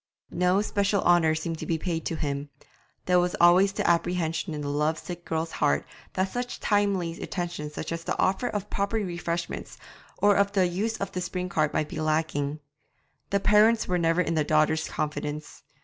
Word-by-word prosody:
No 180 +3 +2
special 200 -2 +1
honour 165 -3 +4
seemed 160 0 -3
to - - -5
be 165 - +1
paid 165 0 -2
him; 145 -3 -3 0.6
there 180 -1 +4
was 180 0 0
always 180 +3 +6
the - - -2
apprehension 170 -2 0
in 150 - -4
the 145 - -4
love 150 +2 0
sick 175 +1 -7
girl's 160 0 -2
heart 70 0 +1 0.3
that 190 0 0
such 245 0 -3
timely 195 -5 0
attentions 170 -5 -4
as - - -3 0.2
the - - -2
offer 195 +6 +1
of 205 -3 -4
proper 200 +2 -1
refreshment 175 -4 -4 0.4
or 205 0 +4
of 200 0 +2
the 190 -2 +3
use 205 +6 -1
of 200 - -4
the 180 - -3
spring 180 0 -3
cart 155 -3 +1
might 155 - 0
be 155 - -4
lacking. 155 -1 -1 0.7
The 200 - +2
parents 215 +3 +4
were 180 -1 +1
never 165 +1 +2
in 165 - -1
the 155 -2 +2
daughter's 155 +1 +2
confidence. 150 0 -4
175 Hz, 180 wpm, -27 LUFS, 155-195 Hz, 0.7 s, always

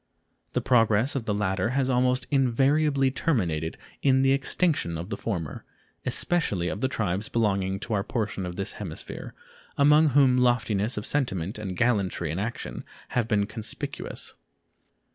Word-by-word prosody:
The - - +1
progress 115 +2 +3
of 130 -5 -2
the 105 - 0
latter 95 0 0
has 135 -2 +2
almost 125 0 +2
invariably 135 +1 +3
terminated 85 - -1 0.2
in 130 -1 +4
the 135 - +4
extinction 140 - +1
of 85 +6 -7
the - - 0
former, 85 -10 -4 0.4
especially 105 - +1
of 100 - -4
the 130 - +2
tribes 105 -5 -2
belonging 95 -4 0
to 115 - -4
our 100 -2 +1
portion 110 -4 -2
of 90 - -6
this 95 0 -3
hemisphere, 90 -7 -7 0.4
among 150 +2 +6
whom 135 -2 +4
loftiness 115 -3 +1
of 105 - -3
sentiment 105 - -1
and 95 -4 -5
gallantry 100 -9 +1
in 85 - -3
action 115 +4 -4 0.3
have 120 -3 0
been 105 -3 +2
conspicuous. 110 +1 -5
115 Hz, 150 wpm, -26 LUFS, 95-130 Hz, 0.4 s, among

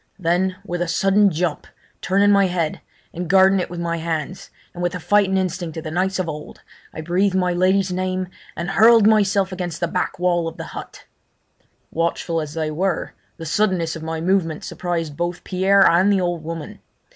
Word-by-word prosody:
Then 180 +1 0
with 175 -2 -3
a 175 - 0
sudden 195 +4 +3
jump, 170 -2 -2 0.3
turning 200 +2 +3
my 200 -1 +4
head, 170 -4 -2 0.3
and 175 0 -5
guarding 190 +1 +5
it 180 - -3
with 175 - -6
my 170 0 -2
hands, 165 +2 -4 0.2
and 175 - -7
with 175 -1 -1
the 180 - -4
fighting 195 +1 +2
instinct 180 -3 -3
of 160 - -5
the 155 - -5
knights 185 +3 0
of 185 -2 -2
old, 150 -1 -8 0.3
I - - -7
breathed 185 +4 +1
my 180 -1 +1
lady's 185 +1 +2
name, 185 0 -2 0.3
and 170 +3 -3
hurled 225 +2 +6
myself 200 -3 +3
against 180 -3 -4
the 170 - 0
back 180 +2 -2
wall 175 -2 +1
of 165 - -7
the - - -5
hut. - - -9 0.9
Watchful 165 0 -1
as 155 0 -7
they 155 -1 -2
were, 180 +4 -2 0.2
the 165 - -8
suddenness 170 -2 0
of 160 - -7
my 160 0 -4
movement 170 -3 0
surprised 165 -4 -3
both 175 +2 -3
Pierre 195 +1 +3
and 185 +4 +4
the 195 - +3
old 175 -2 -2
woman. 165 0 -7
180 Hz, 190 wpm, -21 LUFS, 165-190 Hz, 0.9 s, hurled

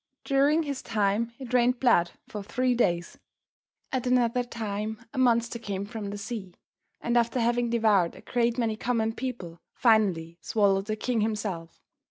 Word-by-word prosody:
During 285 +3 +3
his 280 -3 -4
time 215 +1 0
it 255 -3 -8
rained 250 0 +3
blood 175 -10 +3
for 210 - -6
three 250 +5 0
days. 175 -8 0 0.7
At 255 -1 -1
another 245 -1 +2
time 220 -2 -4
a 265 - -3
monster 235 -1 +2
came 200 -3 -4
from 210 -1 -6
the 205 - -5
sea, 200 -3 -6 0.5
and 235 - -1
after 235 +1 +2
having 240 0 +1
devoured 215 -7 +3
a - - -12
great 240 0 0
many 225 -3 0
common 225 -1 0
people, 225 -10 -5 0.2
finally 185 -8 +2
swallowed 195 -2 +2
the 215 - -1
king 230 +1 -1
himself. 205 -6 -3
225 Hz, 160 wpm, -27 LUFS, 200-245 Hz, 0.7 s, During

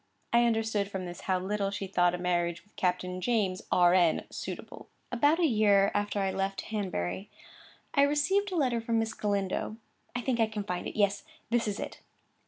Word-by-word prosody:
I 235 0 +5
understood 220 -3 +1
from 190 -2 -4
this 175 0 -7
how 185 -1 +1
little 200 +1 -1
she 200 0 -4
thought 180 -2 +2
a - - -4
marriage 175 -1 0
with 205 - -31
Captain 180 0 -1
James, 195 -3 +1
R.N., 175 -2 +4
suitable. - - -7 0.2
About 290 +6 +3
a 345 - +3
year 205 -6 +4
after 205 0 -1
I 195 -1 +1
left 195 0 -2
Hanbury, 190 - -2 0.6
I 280 - +4
received 330 +8 +2
a - - -2
letter 250 -7 +1
from 230 0 0
Miss 225 0 0
Galindo; 200 +1 -1 0.4
I 245 - -1
think 245 -1 0
I 225 - +4
can 215 -1 -4
find 180 -3 -3
it.—Yes, 200 -1 +1 0.3
this 235 -1 +2
is 205 0 -2
it. - - -6
205 Hz, 185 wpm, -30 LUFS, 185-230 Hz, 0.6 s, I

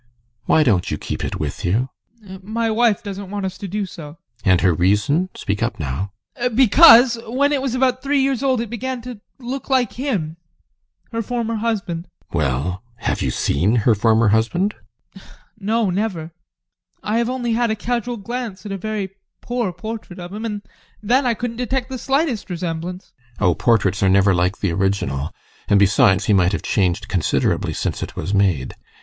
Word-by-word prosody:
Why 155 - +4
don't 100 -10 +2
you - - -2
keep - - -5
it - - -3
with 75 -2 -4
you? 115 +9 +1 0.4
ADOLPH. 190 -1 -10
My 225 +3 -1
wife 225 -2 +2
doesn't 200 -1 -6
want 200 -1 -3
us 185 -1 -4
to 200 - -5
do 205 +2 -2
so. 155 -5 -9 0.3
GUSTAV. 95 - +3
And 90 - +4
her 90 - +4
reason? 105 - +2
Speak 100 +2 -3
up 120 0 -1
now! 75 +7 -3 0.3
ADOLPH. 245 -2 -1
Because, 245 -1 +7
when 275 +5 +1
it 275 - +1
was 260 -2 -1
about 255 0 +1
three 280 +1 +1
years 270 -2 +1
old, 260 -4 +2
it 230 - -5
began 250 +1 -4
to 245 -4 -8 0.2
look 260 +2 -6
like 260 -2 +2
him, 200 - -2 0.7
her 230 -1 -1
former 230 0 -2
husband. 195 -6 -2
GUSTAV. - - -31
Well? 75 - -1
Have 115 - -2
you - - 0
seen 90 - +1
her 120 - +6
former 110 +1 +3
husband? 120 - +1 0.4
ADOLPH. 195 - -14 0.3
No, 215 0 +1
never. 180 -5 -2 0.7
I 215 +2 0
have 235 0 0
only 245 -2 -1
had 235 0 +1
a 220 - +1
casual 240 +2 -2
glance 225 -1 -5
at 205 - -5
a 195 - -2
very 210 -1 -3 0.3
poor 240 -5 -2
portrait 210 +1 -7
of 175 +1 -8
him, 215 +2 -5
and 210 -2 -4 0.4
then 250 +5 +3
I 235 - +2
couldn't 235 0 -4
detect 250 +1 -2
the 260 -1 -5
slightest 270 -5 0
resemblance. 175 +1 -5 0.2
GUSTAV. 105 - 0
Oh, 90 - +4
portraits 100 -2 +2
are 95 - +4
never 100 +1 +4
like 90 +2 +1
the 100 - +1
original, 85 -7 -1 0.4
and, 100 - +4
besides, 100 0 +4
he 110 - +3
might 95 -1 +3
have - - -2
changed 95 -4 0
considerably 90 -5 0
since - - -3
it - - -6
was 95 - -3
made. 95 -10 +1
195 Hz, 190 wpm, -20 LUFS, -, 0.7 s, Because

